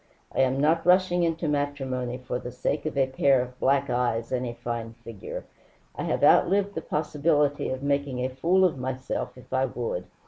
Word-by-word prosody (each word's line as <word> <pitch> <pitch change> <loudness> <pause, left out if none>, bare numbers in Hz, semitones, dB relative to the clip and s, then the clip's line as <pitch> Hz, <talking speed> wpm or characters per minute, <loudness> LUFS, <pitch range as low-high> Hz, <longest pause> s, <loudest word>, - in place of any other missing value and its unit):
I - - -3
am 135 0 +3
not 160 +3 +3
rushing 180 0 +4
into 165 -1 0
matrimony 135 -4 -2
for 125 -1 -4
the 125 - -7
sake 145 +5 -2
of 150 - -4
a 135 - +4
pair 135 0 +3
of 125 0 -5
black 140 +1 +2
eyes 120 -2 -1
and 125 -1 -1
a 120 - -5
fine 120 -1 -5
figure. 115 -4 -7 0.5
I - - -4
have - - -1
outlived 200 +2 +4
the - - -4
possibility 150 -1 0
of 130 +1 -4
making 140 -2 0
a - - -1
fool 170 +9 +3
of 155 -7 0
myself 130 0 -4
if 125 - -12
I 130 0 +2
would. 115 -8 -4
135 Hz, 195 wpm, -26 LUFS, 125-150 Hz, 0.5 s, rushing